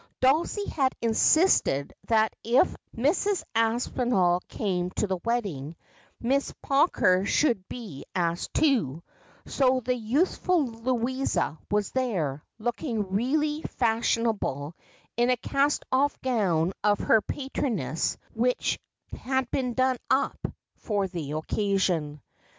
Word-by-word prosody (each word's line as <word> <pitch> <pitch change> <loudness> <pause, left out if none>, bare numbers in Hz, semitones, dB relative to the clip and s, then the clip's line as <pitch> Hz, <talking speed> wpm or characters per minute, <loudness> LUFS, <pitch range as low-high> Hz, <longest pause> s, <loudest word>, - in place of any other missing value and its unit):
Dulcie 315 +10 +2
had 265 -4 0
insisted 230 - +3
that 220 -1 +2
if 240 +3 +3 0.2
Mrs. 355 - +1
Aspinall 225 -5 +1
came 180 -4 -2
to - - +1
the 190 -2 -2
wedding, 185 - -2 0.4
Miss 275 +4 0
Pawker 275 - +3
should 200 -3 +1
be 205 - -8
asked 170 -1 -1
too, 170 - +2 0.4
so 260 -1 +2
the 250 +2 0
useful 290 - +1
Louisa 240 - -1
was 210 -1 0
there, 175 - -1
looking 230 -3 -3
really 295 +8 +1
fashion 230 -3 0
able, 150 -9 -2 0.4
in 240 +1 +3
a 250 - +3
cast 280 +4 0
off 280 +2 +2
gown 190 -9 +1
of 205 0 +3
her 220 - +3
patroness 255 - -2 0.2
which 245 +2 0 0.4
had 260 -1 -2
been 250 -3 -1
done 260 -1 +2
up 270 - +1 0.3
for 205 -3 -1
the 155 -5 -5
occasion. 165 -3 -1
230 Hz, 115 wpm, -27 LUFS, 185-260 Hz, 0.4 s, insisted